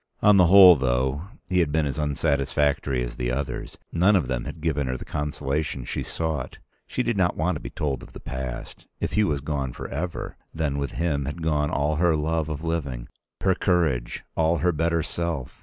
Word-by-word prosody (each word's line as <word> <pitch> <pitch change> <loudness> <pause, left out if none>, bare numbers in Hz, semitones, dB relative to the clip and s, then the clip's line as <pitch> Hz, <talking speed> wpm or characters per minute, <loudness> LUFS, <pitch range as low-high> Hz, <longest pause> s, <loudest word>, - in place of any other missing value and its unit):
On 105 -1 +7
the 90 -2 +6
whole, 95 -1 +10
though, 65 +5 0 0.2
he 90 0 +1
had 80 -4 +2
been 80 0 +2
as 70 +2 -3
unsatisfactory 70 -3 +1
as - - -6
the - - -1
others. 70 +2 -3
None 95 +5 +4
of 85 -9 +2
them 65 -2 -2
had - - -7
given 75 -4 0
her 65 0 -2
the - - -9
consolation 75 -2 -2
she - - -3
sought. 80 -2 -3 0.3
She 125 - -1
did 120 - 0
not 90 -2 +2
want 90 +3 +1
to - - -4
be - - -7
told 70 -3 -2
of - - -12
the - - -9
past. 65 -2 -6
If - - -2
Hugh 105 0 +3
was 75 -3 -1
gone 70 -3 -2
forever, 85 +5 -5 0.2
then 70 -3 -1
with 70 -1 -3
him 75 -5 0
had 75 +4 -5
gone 75 -2 +1
all 75 +2 0
her 85 -1 +3
love 80 +1 0
of 75 0 -4
living, 70 -8 -3 0.3
her 95 - +4
courage, 80 -11 0
all 80 +1 +2
her 90 +1 +2
better 85 0 +1
self. 75 -7 -4
75 Hz, 205 wpm, -25 LUFS, 70-85 Hz, 0.3 s, whole